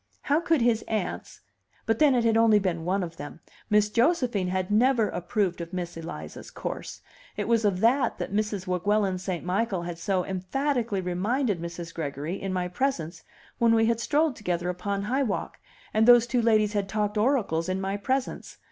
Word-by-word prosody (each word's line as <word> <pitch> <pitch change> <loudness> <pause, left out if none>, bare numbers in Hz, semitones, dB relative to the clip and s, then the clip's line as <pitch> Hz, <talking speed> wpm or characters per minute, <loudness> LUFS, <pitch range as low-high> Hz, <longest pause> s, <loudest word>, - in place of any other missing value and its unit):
How 290 +3 +2
could 330 -5 +1
his 235 -1 +2
aunts 215 -5 -4 0.4
but 225 -1 0
then 290 -4 +5
it 240 - +2
had 225 -1 +3
only 225 -1 +5
been 175 -5 -1
one 190 +2 0
of 165 -1 -7
them; 145 - -8 0.3
Miss 210 -1 +4
Josephine 240 - +2
had 185 +1 -2
never 235 +1 +3
approved 180 0 -1
of 170 +1 -8
Miss 175 -1 -4
Eliza's 165 +1 -8
course; - - -6 0.4
it - - -2
was 230 -1 +2
of 195 -2 +1
that 245 +2 +3
that - - -5
Mrs. 210 -2 -1
Weguelin 190 +1 0
St. 180 -2 -4
Michael 190 -1 -1
had 170 -1 -6
so 185 0 0
emphatically 225 +3 -1
reminded 195 +3 -1
Mrs. 170 0 -6
Gregory 155 +3 -4
in 195 - -3
my 180 -1 -1
presence 175 - -2 0.4
when 230 -1 +4
we 225 0 +4
had 230 0 +1
strolled 300 +3 +1
together 180 -4 -2
upon 195 +2 -3
High 260 +7 0
Walk, 220 -7 -3 0.3
and 220 +1 +3
those 240 -1 +8
two 245 0 0
ladies 215 -2 +3
had 200 -2 -1
talked 210 0 -1
oracles 210 - +1
in 185 +1 -1
my 195 +1 -2
presence. 260 +6 -3
205 Hz, 185 wpm, -26 LUFS, 180-235 Hz, 0.4 s, those